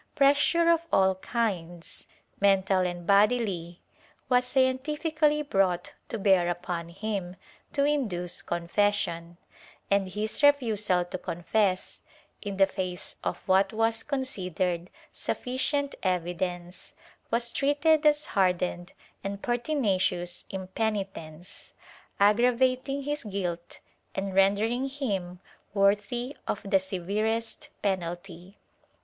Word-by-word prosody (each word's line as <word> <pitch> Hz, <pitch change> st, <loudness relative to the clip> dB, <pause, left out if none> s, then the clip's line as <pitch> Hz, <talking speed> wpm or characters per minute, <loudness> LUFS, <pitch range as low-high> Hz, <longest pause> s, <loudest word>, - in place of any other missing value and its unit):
Pressure 290 Hz, +5 st, +4 dB
of 335 Hz, -1 st, +5 dB
all 190 Hz, 0 st, +4 dB
kinds, 185 Hz, -5 st, -3 dB, 0.3 s
mental 195 Hz, -1 st, +3 dB
and 175 Hz, -1 st, -2 dB
bodily, 200 Hz, -4 st, +2 dB, 0.5 s
was 250 Hz, 0 st, +4 dB
scientifically 300 Hz, +4 st, +1 dB
brought 190 Hz, -9 st, +1 dB, 0.2 s
to 230 Hz, -, -2 dB
bear 190 Hz, -4 st, +3 dB
upon 175 Hz, -1 st, -3 dB
him 190 Hz, -1 st, -4 dB, 0.4 s
to 280 Hz, -1 st, +2 dB
induce 210 Hz, -13 st, -1 dB
confession, 170 Hz, -1 st, -1 dB, 0.5 s
and 200 Hz, -1 st, +2 dB
his 210 Hz, +7 st, -3 dB
refusal 220 Hz, -11 st, +3 dB
to 180 Hz, +1 st, -6 dB
confess, 185 Hz, +3 st, -1 dB, 0.4 s
in 200 Hz, -2 st, -5 dB
the 195 Hz, -, +6 dB
face 185 Hz, -2 st, -4 dB
of -, -, -1 dB
what 195 Hz, +1 st, +4 dB
was 225 Hz, 0 st, +1 dB
considered 185 Hz, -, -2 dB, 0.2 s
sufficient 280 Hz, +3 st, -1 dB
evidence, 180 Hz, -1 st, -3 dB, 0.4 s
was 235 Hz, 0 st, -1 dB
treated 295 Hz, +3 st, +3 dB
as 300 Hz, 0 st, +4 dB
hardened 180 Hz, -2 st, 0 dB, 0.3 s
and 200 Hz, 0 st, -5 dB
pertinacious 205 Hz, -, 0 dB
impenitence, 190 Hz, -4 st, -4 dB, 0.5 s
aggravating 255 Hz, +6 st, +3 dB
his 295 Hz, +1 st, -2 dB
guilt 180 Hz, -5 st, -4 dB, 0.4 s
and 195 Hz, 0 st, -2 dB
rendering 215 Hz, +7 st, +2 dB
him 195 Hz, -11 st, -3 dB, 0.4 s
worthy 210 Hz, +6 st, +1 dB
of -, -, -1 dB
the 195 Hz, 0 st, +4 dB
severest 210 Hz, +5 st, -2 dB
penalty. 180 Hz, -1 st, -3 dB
200 Hz, 100 wpm, -28 LUFS, 180-250 Hz, 0.5 s, the